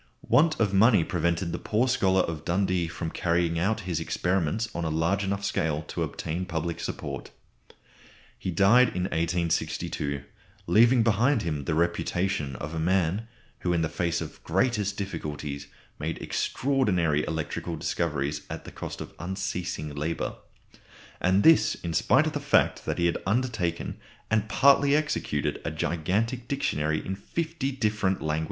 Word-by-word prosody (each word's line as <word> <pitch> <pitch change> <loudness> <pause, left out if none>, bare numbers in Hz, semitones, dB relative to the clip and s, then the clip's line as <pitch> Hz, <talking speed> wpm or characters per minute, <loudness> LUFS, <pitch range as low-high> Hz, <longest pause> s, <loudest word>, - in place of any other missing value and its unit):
Want 155 +1 +4
of 105 -3 +2
money 100 -2 +5
prevented 85 +1 0
the - - -3
poor 115 +4 +1
scholar 95 -7 +3
of 80 -4 -3
Dundee 90 -1 +1
from 80 0 -5
carrying 85 -1 +1
out 110 +5 +1
his 90 -4 -2
experiments 90 +5 0
on 85 - -3
a 80 - 0
large 85 +6 +1
enough 100 +1 -2
scale 80 -5 0
to - - -3
obtain 85 +4 -3
public 85 -1 -3
support. - - -5 1.1
He - - -3
died 100 +8 +5
in 90 - 0
1862, 85 -4 -1 0.4
leaving 120 +3 +5
behind 115 +3 +3
him 75 -4 -2
the 80 - 0
reputation 85 -3 0
of 75 +5 -6
a 80 - -2
man 95 +5 +1 0.3
who 90 - 0
in 85 -1 +1
the 80 - 0
face 85 +1 -1
of 80 - -5
the - - -20
greatest 100 +2 0
difficulties 75 -7 -5 0.3
made 80 +2 -3
extraordinary 90 - +1
electrical 80 +1 -3
discoveries 75 -3 -1
at - - -6
the - - -8
cost - - -7
of - - -8
unceasing 90 -4 -3
labour; 75 +3 -2 0.9
and 95 +2 +3
this 160 -1 +6
in 85 -1 -5
spite 130 - +4
of 155 - -2
the 145 - -1
fact 145 0 +2
that - - -2
he 85 - +1
had 85 - +1
undertaken 105 -7 -1 0.3
and 110 -1 +1
partly 140 +2 +5
executed 150 - -1
a - - -2
gigantic 95 - -1
dictionary 80 - -1
in 95 - -2
fifty 155 - -3
different 105 -6 0
languages! 80 0 -1
90 Hz, 155 wpm, -27 LUFS, 80-110 Hz, 1.1 s, this